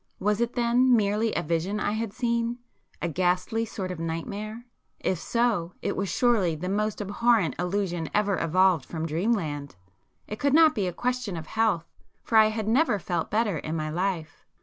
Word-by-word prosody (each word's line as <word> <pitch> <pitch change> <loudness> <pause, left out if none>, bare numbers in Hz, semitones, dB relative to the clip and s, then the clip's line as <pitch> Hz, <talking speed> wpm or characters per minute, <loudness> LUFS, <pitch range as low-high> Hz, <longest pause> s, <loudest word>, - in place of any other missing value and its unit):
Was 210 +2 0
it 235 0 0
then 245 +1 +3
merely 215 +1 +1
a 170 - 0
vision 170 +6 -1
I 205 - 0
had 220 0 -2
seen?—a 235 -4 -3
ghastly 180 +6 0
sort 190 -4 -5
of 180 - -6
nightmare? 205 +8 -5 0.3
If 185 - -1
so, 220 -6 0
it - - -1
was 195 0 -2
surely 200 -4 +2
the 180 +4 -4
most 210 +1 -1
abhorrent 205 -2 +2
illusion 180 -2 -1
ever 205 -3 +1
evolved 180 -1 +3
from 160 +2 -5
dreamland! 160 - -1 0.5
It 210 - -6
could 280 0 +2
not 320 -1 +7
be 200 -3 -1
a - - -1
question 245 -3 -2
of 160 - -6
health, 215 -3 +1 0.4
for 225 - -3
I 215 - +7
had 215 -1 -3
never 245 0 +3
felt 175 -3 -2
better 210 -6 +1
in 155 +2 -4
my 155 -1 -2
life. 175 -2 -3
200 Hz, 175 wpm, -26 LUFS, 170-230 Hz, 0.5 s, not